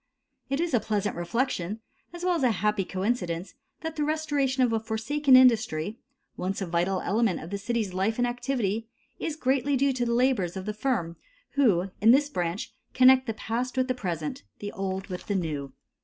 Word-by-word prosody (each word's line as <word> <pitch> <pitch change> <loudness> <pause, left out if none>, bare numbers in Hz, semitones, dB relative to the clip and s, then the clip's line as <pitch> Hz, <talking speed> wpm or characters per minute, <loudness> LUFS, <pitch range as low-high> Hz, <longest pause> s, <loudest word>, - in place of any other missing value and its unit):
It 275 +1 0
is 340 -3 -1
a 240 - +5
pleasant 210 -1 -1
reflection 205 +1 -1 0.3
as 345 0 -8
well 365 - +3
as 335 - 0
a 255 - +4
happy 210 -1 +1
coincidence 185 -3 -2 0.3
that 320 0 -5
the 300 - +1
restoration 290 -4 +1
of 240 -2 +2
a 225 - +2
forsaken 255 +6 +2
industry, 220 -6 +4 0.4
once 190 +2 -3
a 195 - -2
vital 175 +2 0
element 210 -2 +1
in 160 - -8
the 200 - -3
city's 220 -2 -2
life 195 +4 0
and 245 - +2
activity, 240 -3 -1 0.3
is 315 - -3
greatly 270 -1 +1
due 275 +1 +2
to 250 -1 -1
the 235 - +1
labors 235 -8 +1
of 190 - -5
the 210 - -2
firm 210 -8 -1 0.3
who, 195 -9 +2
in 220 - +5
this 285 +4 +5
branch, 175 -4 -3 0.2
connect 260 0 +6
the 225 - -2
past 245 +4 -3
with 255 0 +2
the 255 - +1
present, 170 -10 -4 0.2
the 205 0 -6
old 190 0 -3
with 180 -3 -7
the 205 - 0
new. 150 -6 -2
225 Hz, 195 wpm, -27 LUFS, 190-260 Hz, 0.4 s, connect